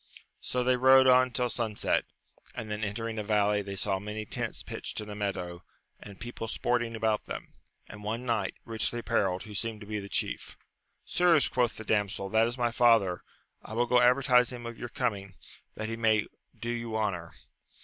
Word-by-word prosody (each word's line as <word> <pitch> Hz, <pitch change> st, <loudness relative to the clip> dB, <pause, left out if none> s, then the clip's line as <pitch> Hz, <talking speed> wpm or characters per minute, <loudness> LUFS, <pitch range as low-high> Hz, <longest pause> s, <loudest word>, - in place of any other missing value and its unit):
So 125 Hz, 0 st, -1 dB
they 125 Hz, 0 st, +3 dB
rode 130 Hz, +1 st, +7 dB
on 130 Hz, 0 st, +6 dB
till 125 Hz, 0 st, 0 dB
sunset, 110 Hz, -3 st, 0 dB, 0.5 s
and 110 Hz, -2 st, -5 dB
then 105 Hz, +1 st, -3 dB
entering 110 Hz, +2 st, -3 dB
a -, -, -2 dB
valley, 105 Hz, -1 st, +2 dB
they 100 Hz, -1 st, -6 dB
saw 95 Hz, 0 st, 0 dB
many 105 Hz, +2 st, -5 dB
tents -, -, -3 dB
pitched -, -, -5 dB
in 105 Hz, -1 st, -6 dB
a -, -, -6 dB
meadow, 95 Hz, -4 st, -3 dB, 0.4 s
and 100 Hz, -2 st, -12 dB
people 120 Hz, -1 st, -6 dB
sporting 120 Hz, 0 st, 0 dB
about 110 Hz, -1 st, 0 dB
them, -, -, -7 dB, 0.3 s
and 105 Hz, 0 st, -11 dB
one 115 Hz, +4 st, -3 dB
knight, 110 Hz, -5 st, 0 dB
richly 115 Hz, +1 st, -1 dB
apparelled, 95 Hz, -5 st, 0 dB
who 105 Hz, -1 st, -10 dB
seemed 110 Hz, +1 st, -2 dB
to -, -, -8 dB
be 105 Hz, 0 st, -3 dB
the 100 Hz, 0 st, -8 dB
chief. -, -, -2 dB, 0.5 s
Sirs, 175 Hz, -4 st, +4 dB
quoth 120 Hz, -2 st, 0 dB
the 110 Hz, -, -7 dB
damsel, 105 Hz, -2 st, 0 dB
that 110 Hz, +2 st, +4 dB
is 120 Hz, +2 st, -4 dB
my 120 Hz, -1 st, +1 dB
father: 115 Hz, -7 st, +4 dB, 0.4 s
I -, -, -10 dB
will 120 Hz, +1 st, +2 dB
go 125 Hz, 0 st, +4 dB
advertise 125 Hz, 0 st, +5 dB
him 120 Hz, -1 st, -7 dB
of 115 Hz, 0 st, -5 dB
your 120 Hz, -, -6 dB
coming, 100 Hz, -4 st, -2 dB, 0.4 s
that 110 Hz, -, -4 dB
he 115 Hz, -, -3 dB
may 110 Hz, -2 st, +2 dB, 0.3 s
do 120 Hz, -, -3 dB
you 115 Hz, -2 st, -3 dB
honour. 90 Hz, -6 st, -2 dB
110 Hz, 190 wpm, -29 LUFS, 105-120 Hz, 0.5 s, rode